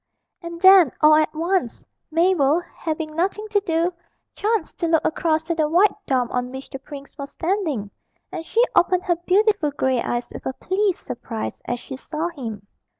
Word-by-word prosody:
And 340 -1 -7
then 375 -6 +7
all 305 0 +7
at 310 0 +3
once, 335 -6 -1 0.2
Mabel, 330 -3 +3
having 310 -1 -4
nothing 395 +5 -1
to 415 -1 +2
do, 340 -1 0 0.4
chanced 425 -5 -2
to 340 - 0
look 325 -1 +2
across 315 0 +1
to 335 +1 -2
the 310 -2 0
white 365 +6 +4
dome 250 -3 +1
on 250 0 -2
which 265 +1 -9
the 270 - -6
prince 280 0 -11
was 280 0 -5
standing, 320 - -2 0.4
and - - -5
she 450 +8 +2
opened 365 +1 +3
her 350 -2 +1
beautiful 405 -4 +3
grey 265 -4 0
eyes 240 0 -2
with - - -7
a 260 - -2
pleased 380 +5 -1
surprise 230 -2 -6
as 245 0 -3
she 265 - -8
saw 310 +5 -4
him. 225 -11 -7
320 Hz, 180 wpm, -22 LUFS, 270-365 Hz, 0.4 s, then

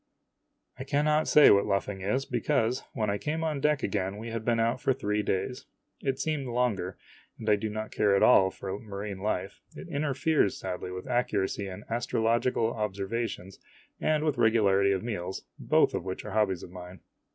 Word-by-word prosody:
I - - -3
cannot 150 +3 +1
say 150 - +8
what 100 0 +4
luffing 100 0 -1
is, 130 +8 0
because, 125 0 0
when 110 -4 0
I 100 - -2
came 160 +2 -2
on 155 -3 -1
deck 150 -1 +2
again, 95 0 -1
we 115 +2 -6
had 115 -1 -4
been 115 0 +1
out 115 +3 +1
for 135 - +2
three 105 -4 -1
days. 105 +5 -2 0.3
It 135 -2 -1
seemed 150 -3 -2
longer, 115 -7 -1 0.4
and 110 - -8
I 105 - +5
do 110 +2 -3
not 110 +1 -5
at 100 -2 +4
all 95 -1 +6
care - - -17
for 95 +1 -5
marine 100 -2 -6
life 95 -2 -3
it - - -9
interferes 150 - +1
sadly 90 -1 -5
with 90 0 -6
accuracy 105 -5 0
in 95 +2 -8
astrological 115 0 0
observations 100 -1 -3 0.4
and 155 -1 +1
with 150 -5 0
regularity 100 -4 +4
of 95 0 -1
meals, 95 -5 -4 0.2
both - - +3
of - - -2
which 95 0 -5
are 105 - -6
hobbies 95 -4 +1
of 90 - -10
mine. 90 0 -10
110 Hz, 185 wpm, -28 LUFS, 100-125 Hz, 0.4 s, say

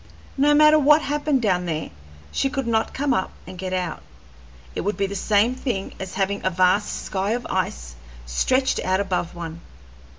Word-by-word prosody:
No 290 +2 +4
matter 305 +1 +7
what 300 +2 +5
happened 290 -2 0
down 180 -4 +1
there, 160 -1 -3 0.4
she 270 - 0
could 270 -1 -3
not 225 -1 +1
come 275 -1 0
up 190 - 0 0.2
and - - -9
get 185 0 -5
out; 180 -2 -2 0.7
it - - -3
would 205 +3 -2
be 200 - +1
the 195 - -5
same 210 +4 +2
thing 245 -7 -3
as 190 -1 -6
having 200 +1 -1
a 185 - +2
vast 185 +3 +1
sky 195 +2 -1
of 245 +1 -3
ice - - -2 0.3
stretched 255 - +1
out 185 +1 +1
above 185 -4 -2
one. 165 -1 -7
200 Hz, 185 wpm, -23 LUFS, 185-260 Hz, 0.7 s, matter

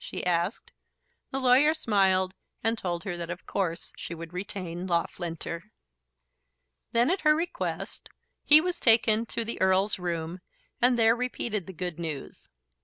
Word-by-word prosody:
she - - -5
asked. 180 - -1 0.6
The 270 - -2
lawyer 265 +5 +5
smiled, 190 -8 +2 0.3
and 225 0 +3
told 175 -5 -3
her 195 -4 -3
that 170 -1 -5
of 175 +1 -6
course 170 -4 -3
she 170 - -7
would 165 +1 -9
retain 180 -1 -5
Loughlinter. 170 +1 -3 1.2
Then, 240 +6 +3
at 380 - 0
her 305 0 +5
request, 345 +3 -4 0.3
he 300 +1 +8
was 350 +1 -2
taken 225 -1 +4
to 230 - -2
the 230 - -4
Earl's 190 +2 +3
room 170 0 -3 0.4
and 245 0 +4
there 225 0 +5
repeated 235 -5 -2
the 190 - -8
good 175 -1 -4
news. 160 -5 -6
195 Hz, 150 wpm, -28 LUFS, 175-235 Hz, 1.2 s, he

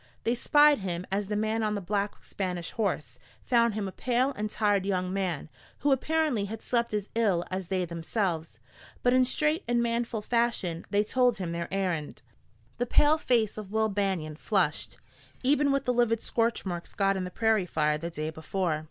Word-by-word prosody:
They 235 - +2
spied 295 +4 +5
him 180 -2 -3
as 200 +1 -1
the 210 - -2
man 220 +1 0
on 210 -1 0
the - - -1
black 200 +2 -2
Spanish 180 -3 -3
horse, 150 - -2 0.2
found 235 -3 +3
him 210 -2 -2
a - - -5
pale 255 +5 +1
and 215 -5 -3
tired 205 -3 +1
young 185 -2 -1
man, 185 -7 -2 0.3
who 290 - +2
apparently 290 -5 +1
had 220 +2 -7
slept 235 -1 0
as 210 -1 -2
ill 200 -7 +2
as 185 -1 -3
they 185 -1 0
themselves. 165 - -3 0.4
But 245 - +4
in 255 0 +5
straight 305 +7 0
and 240 0 +2
manful 230 -2 -1
fashion 230 -8 0
they 205 0 +2
told 245 +1 +2
him 180 -3 -3
their 170 0 -4
errand. 180 -6 -2 0.6
The 245 - 0
pale 300 +5 +4
face 225 -7 +1
of 200 -2 -9
Will 220 0 +2
Banion 190 -7 -1
flushed, - - 0 0.5
even 285 +2 +3
with 275 0 0
the 250 - +2
livid 235 -2 +2
scorch 230 -1 0
marks 175 -2 -5
got 195 -2 +2
in 190 - -2
the 180 - -4
prairie 220 -1 +1
fire 150 -2 +1
the 170 +2 -4
day 155 -1 -4
before. 160 0 -2
205 Hz, 190 wpm, -28 LUFS, 180-235 Hz, 0.6 s, spied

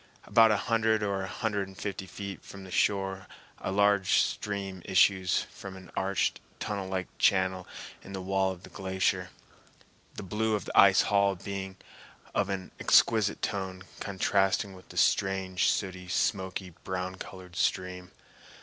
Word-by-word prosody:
About 115 -1 +6
a 105 - +3
hundred 110 0 +1
or 100 -1 -1
a 95 - -4
hundred 105 -2 -2
and 95 0 -14
fifty 95 -2 -4
feet 100 -1 -7
from 100 -1 -10
the 95 - -11
shore 95 0 0 0.3
a - - -3
large 100 -1 +3
stream 100 -2 0
issues 95 -1 +3
from 95 -1 -9
an 95 -2 -13
arched, 95 0 0 0.2
tunnel 100 -2 -3
like 95 -1 -2
channel 95 -1 +2 0.3
in 100 - -11
the 95 - -4
wall 95 +1 +1
of 95 -1 -9
the - - -12
glacier, 95 0 -1 0.9
the - - -6
blue 110 +3 0
of 105 - -4
the - - -6
ice 95 -1 +7
hall 100 -1 +3
being 95 +1 -6 0.6
of 100 -1 +1
an 95 -2 -4
exquisite 110 -3 +4
tone, 95 -1 -3 0.2
contrasting 95 +1 +1
with 90 0 -15
the - - -10
strange, 95 -2 +2
sooty, 95 -2 -2
smoky, 95 0 -1
brown 90 0 -3
colored 90 -1 -10
stream. 90 -2 -1
95 Hz, 155 wpm, -29 LUFS, 95-100 Hz, 0.9 s, ice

